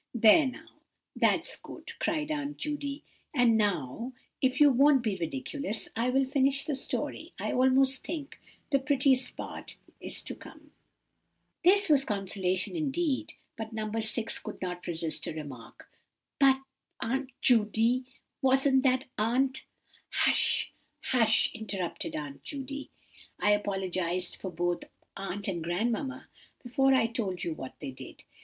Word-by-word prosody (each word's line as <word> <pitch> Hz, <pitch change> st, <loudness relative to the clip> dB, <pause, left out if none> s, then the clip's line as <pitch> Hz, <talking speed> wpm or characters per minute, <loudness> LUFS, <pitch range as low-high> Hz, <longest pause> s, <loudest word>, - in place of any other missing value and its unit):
"There 235 Hz, +6 st, +7 dB
now, 255 Hz, -, -8 dB, 0.5 s
that's -, -, +2 dB
good!" -, -, -9 dB
cried 310 Hz, -1 st, -1 dB
Aunt 290 Hz, -1 st, -3 dB
Judy; 290 Hz, -1 st, -4 dB, 0.3 s
"and 245 Hz, -3 st, +5 dB
now, 205 Hz, -, -1 dB, 0.3 s
if 260 Hz, 0 st, +2 dB
you 295 Hz, -1 st, +8 dB
won't 270 Hz, 0 st, +5 dB
be 215 Hz, -4 st, 0 dB
ridiculous, 255 Hz, -, -2 dB
I 235 Hz, +2 st, +1 dB
will 270 Hz, +1 st, +3 dB
finish 275 Hz, +1 st, +2 dB
the 300 Hz, -, -1 dB
story. 270 Hz, -, -3 dB
I -, -, -2 dB
almost 260 Hz, +1 st, +3 dB
think 300 Hz, -2 st, -6 dB, 0.3 s
the 275 Hz, -, +4 dB
prettiest 265 Hz, -2 st, +2 dB
part -, -, -7 dB, 0.2 s
is -, -, -5 dB
to -, -, -5 dB
come." -, -, -14 dB, 0.9 s
This 395 Hz, +3 st, +6 dB
was 290 Hz, -4 st, +5 dB
consolation 190 Hz, -, -1 dB
indeed; 310 Hz, -1 st, -1 dB, 0.2 s
but 225 Hz, 0 st, -6 dB
No. 215 Hz, -1 st, -3 dB
6 225 Hz, +1 st, 0 dB
could -, -, -8 dB
not 180 Hz, -1 st, -5 dB
resist 165 Hz, -2 st, -2 dB
a -, -, -3 dB
remark. 140 Hz, -7 st, -9 dB, 0.5 s
"But, 270 Hz, -1 st, +6 dB, 0.4 s
Aunt 265 Hz, +3 st, -2 dB
Judy, 230 Hz, +2 st, +3 dB, 0.4 s
wasn't 265 Hz, 0 st, +4 dB
that 260 Hz, -1 st, +2 dB, 0.2 s
aunt—" 260 Hz, +5 st, +1 dB, 0.5 s
"Hush, -, -, +3 dB, 0.4 s
hush," 225 Hz, -3 st, +4 dB
interrupted 200 Hz, -6 st, -3 dB
Aunt 145 Hz, -2 st, -6 dB
Judy, 275 Hz, -, -6 dB, 0.5 s
"I 210 Hz, -, +3 dB
apologized 185 Hz, -3 st, -1 dB
for 190 Hz, -, -5 dB
both 175 Hz, 0 st, -1 dB, 0.3 s
aunt 195 Hz, +1 st, -4 dB
and 175 Hz, -4 st, -2 dB
grandmamma 235 Hz, -, -2 dB, 0.4 s
before 270 Hz, +2 st, +2 dB
I 250 Hz, -3 st, +4 dB
told 210 Hz, -6 st, -2 dB
you 170 Hz, -, -1 dB
what 130 Hz, -4 st, -8 dB
they -, -, -5 dB
did. 130 Hz, -, -11 dB
245 Hz, 135 wpm, -29 LUFS, 195-270 Hz, 0.9 s, you